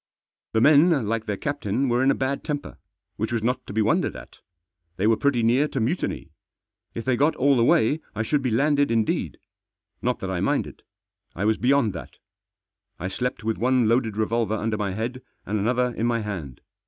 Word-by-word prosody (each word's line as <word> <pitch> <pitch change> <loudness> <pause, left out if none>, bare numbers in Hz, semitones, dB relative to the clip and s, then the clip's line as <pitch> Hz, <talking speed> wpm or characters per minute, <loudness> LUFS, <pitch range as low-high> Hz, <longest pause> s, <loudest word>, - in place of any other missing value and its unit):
The 110 - +2
men, 150 -3 +5
like 110 0 -2
their 105 -2 -2
captain, 140 -2 -1
were 120 0 +1
in 135 - +3
a - - +3
bad 135 +1 -2
temper. 145 -2 -5 0.4
Which 110 +2 -2
was 115 -2 -1
not 125 +3 -1
to - - -7
be 110 +2 +1
wondered 105 - +1
at. - - -12 0.6
They 95 - 0
were 110 +1 +4
pretty 125 -1 +1
near 125 +6 +3
to 135 - -3
mutiny. 115 - -2 0.6
If 115 - -5
they 130 -1 +2
got 150 +5 +2
all 140 +1 +3
the 120 - +3
way 120 +5 +3 0.2
I 110 - -1
should 145 +5 0
be 130 - 0
landed 145 +5 +2
indeed. 115 -2 0 0.6
Not - - 0
that - - -3
I - - -2
minded. - - -1 0.5
I 95 - -2
was 110 0 +2
beyond 125 -4 +2
that 85 - -9 0.8
I 95 - -3
slept 125 +2 -3
with 110 0 -2
one 125 -1 +2
loaded 115 -2 +1
revolver 110 0 0
under 110 0 -1
my 100 -3 -2
head, 120 +5 -4 0.2
and 105 +1 -1
another 125 +3 +1
in 115 - 0
my 115 -1 0
hand. 85 - -6
115 Hz, 200 wpm, -24 LUFS, 110-130 Hz, 0.8 s, men